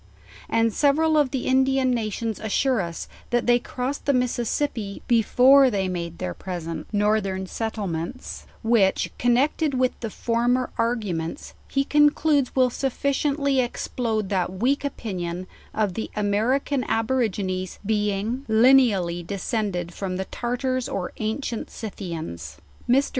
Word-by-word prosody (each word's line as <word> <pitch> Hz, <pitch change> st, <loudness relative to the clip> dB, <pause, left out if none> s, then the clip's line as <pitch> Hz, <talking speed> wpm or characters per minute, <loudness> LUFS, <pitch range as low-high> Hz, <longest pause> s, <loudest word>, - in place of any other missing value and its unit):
And 225 Hz, -1 st, +2 dB
several 310 Hz, +4 st, +3 dB
of 295 Hz, -3 st, +4 dB
the 260 Hz, -1 st, -3 dB
Indian 265 Hz, 0 st, +3 dB
nations 225 Hz, -1 st, -2 dB
assure 230 Hz, +2 st, +1 dB
us, 170 Hz, -2 st, -5 dB, 0.2 s
that 240 Hz, 0 st, +1 dB
they 240 Hz, 0 st, +4 dB
crossed 255 Hz, +3 st, -4 dB
the 280 Hz, -, +4 dB
Mississippi 240 Hz, -3 st, -1 dB
before 255 Hz, +4 st, +6 dB
they 195 Hz, -4 st, 0 dB
made 170 Hz, -2 st, -4 dB
their 90 Hz, -, -3 dB
present 170 Hz, -, -5 dB
northern 205 Hz, -2 st, +1 dB
settlements; 205 Hz, 0 st, -4 dB, 0.2 s
which, 220 Hz, -4 st, +2 dB
connected 270 Hz, +4 st, +2 dB
with 255 Hz, 0 st, +2 dB
the 225 Hz, -, -4 dB
former 240 Hz, +3 st, 0 dB
ar 230 Hz, +1 st, +2 dB
guments, 170 Hz, -8 st, -4 dB
he 275 Hz, -, +1 dB
concludes 295 Hz, -1 st, +3 dB
will 255 Hz, -2 st, +4 dB
sufficiently 280 Hz, +1 st, 0 dB
explode 230 Hz, -4 st, -1 dB
that 185 Hz, -3 st, 0 dB
weak 250 Hz, +10 st, 0 dB
opinion 185 Hz, -10 st, -4 dB, 0.3 s
of 210 Hz, -4 st, 0 dB
the 220 Hz, -, -4 dB
American 235 Hz, +7 st, +1 dB
Aborigines 210 Hz, -6 st, -1 dB
being 210 Hz, +4 st, 0 dB
lineally 220 Hz, -7 st, +4 dB
descend 200 Hz, +2 st, -2 dB
ed 175 Hz, 0 st, -4 dB
from 185 Hz, -1 st, -3 dB
the 190 Hz, -, -2 dB
Tartars 255 Hz, +3 st, -2 dB
or 190 Hz, -8 st, -3 dB
ancient 225 Hz, +2 st, -3 dB
Scythians. 165 Hz, -, -6 dB, 0.3 s
Mr. 270 Hz, +3 st, +4 dB
230 Hz, 130 wpm, -24 LUFS, 195-260 Hz, 0.3 s, before